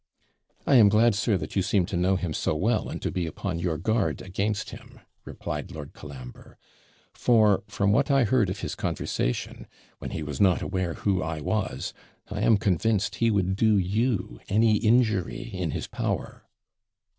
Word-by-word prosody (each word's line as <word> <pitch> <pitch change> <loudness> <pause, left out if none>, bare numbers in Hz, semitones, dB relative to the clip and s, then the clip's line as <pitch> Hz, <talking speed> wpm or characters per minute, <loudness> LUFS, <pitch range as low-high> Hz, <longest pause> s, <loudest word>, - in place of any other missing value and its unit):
'I 140 - +4
am 105 -4 +7
glad, 110 +2 +4
sir, 105 0 +1
that - - -7
you 95 - +3
seem 95 0 +1
to 90 - -5
know 90 +2 +2
him 90 -4 -2
so 75 - -1
well, 110 +8 0
and - - -5
to - - -1
be 90 -2 -2
upon 80 +1 -4
your 85 -2 -1
guard 110 +3 0
against 100 +3 -2
him,' - - -12 0.3
replied - - -5
Lord 70 -2 -8
Colambre; 65 -4 -11 0.6
'for, 110 -5 +3
from 100 0 +1
what 135 +7 +2
I 135 -2 +4
heard 115 -3 +2
of 95 +2 -5
his - - -3
conversation, - - -3 0.3
when - - -6
he 80 - -4
was 75 -2 -4
not 95 -3 +4
aware 95 -3 -2
who 95 -3 0
I 80 -1 -3
was, 75 - -2 0.4
I - - -3
am 110 - +5
convinced 100 +2 0
he 115 - +2
would 95 -3 +1
do 110 0 +3
you 100 - -1
any 110 +1 +4
injury 110 -4 +2
in - - -2
his - - -3
power.' - - -4
100 Hz, 180 wpm, -26 LUFS, 90-110 Hz, 0.6 s, am